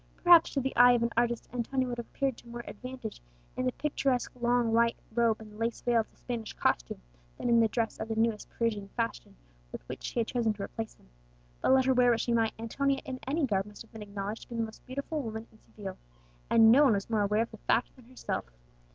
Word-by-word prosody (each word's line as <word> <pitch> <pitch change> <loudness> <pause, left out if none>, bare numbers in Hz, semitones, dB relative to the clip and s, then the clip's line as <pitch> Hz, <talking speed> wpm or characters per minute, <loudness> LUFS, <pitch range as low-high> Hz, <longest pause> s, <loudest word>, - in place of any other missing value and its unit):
Perhaps 345 -2 +7
to - - +3
the 265 0 -2
eye 245 +1 +8
of 240 -1 +2
an 235 - 0
artist 235 0 0
Antonia 255 +2 -1
would 240 -1 -4
have 235 - -6
appeared 270 -3 -2
more 235 0 -8
to - - -9
advantage 255 -1 -8 0.3
in 255 - -1
the - - +2
picturesque 275 -4 0
long 240 -2 +1
white 230 0 +3 0.2
robe 230 -1 +2
and 215 -1 -12
lace 230 0 -1
veil 240 -1 +3
of 220 - -2
the - - -29
Spanish 230 -3 -5
costume, - - 0 0.4
than - - -2
in 235 0 +5
the 225 - +5
dress 225 +1 -2
of - - -3
the 225 - -2
newest 225 -1 0
Parisian 215 -4 -2
fashion - - -3 0.4
with - - -9
which - - -7
she - - -6
had 230 - +2
chosen 230 -3 0
to 200 -1 -6
replace 225 +2 -5
them. - - -25 0.5
But - - +4
let 260 -1 +5
her 260 - +4
wear 250 -1 +5
what 230 -1 +3
she 235 - 0
might, 225 -1 +2
Antonia 270 +5 -1
in 260 -1 -5
any 295 +2 +1
garb 195 -4 0
must 210 +1 -11
have 225 - -23
been 220 - -10
acknowledged 205 +1 -5
to - - -13
be 240 - -6
the 230 - 0
most 220 0 -8
beautiful 280 +4 -3
woman 220 -2 -5
in 220 - -21
Seville; 195 -3 -8 0.5
and 225 -1 +7
no 275 +5 +7
one 255 - +5
was 195 -1 -1
more 220 -2 +1
aware 210 +2 +2
of 230 - -9
the 220 - -10
fact 230 - 0
than 250 - -18
herself. 255 +1 -4
235 Hz, 245 wpm, -30 LUFS, 220-250 Hz, 0.5 s, eye